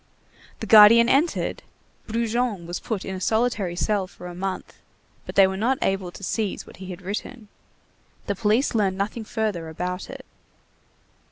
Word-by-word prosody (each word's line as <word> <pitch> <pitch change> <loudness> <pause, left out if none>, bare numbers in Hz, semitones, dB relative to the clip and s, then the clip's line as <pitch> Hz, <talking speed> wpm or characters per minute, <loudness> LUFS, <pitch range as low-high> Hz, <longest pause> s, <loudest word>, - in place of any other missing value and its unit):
The - - -3
guardian 225 +2 +8
entered, 300 +7 +1 0.5
Brujon 230 -3 -1
was 175 +1 -4
put 215 -5 -4
in 190 - -4
a 185 - -6
solitary 220 -5 0
cell 200 +1 0
for 180 - -13
a 175 - -7
month, 185 +1 -5 0.5
but - - -7
they 195 - +7
were 190 0 -1
not 240 +7 +1
able 195 -2 -1
to - - -11
seize 210 0 -2
what - - -14
he 190 - -9
had 185 0 -8
written. 210 +3 -6 0.8
The 200 - -1
police 215 +7 +1
learned 195 -4 +1
nothing 215 +3 -3
further 210 -8 -2
about 180 +3 -4
it. - - -9
205 Hz, 165 wpm, -24 LUFS, 185-225 Hz, 0.8 s, guardian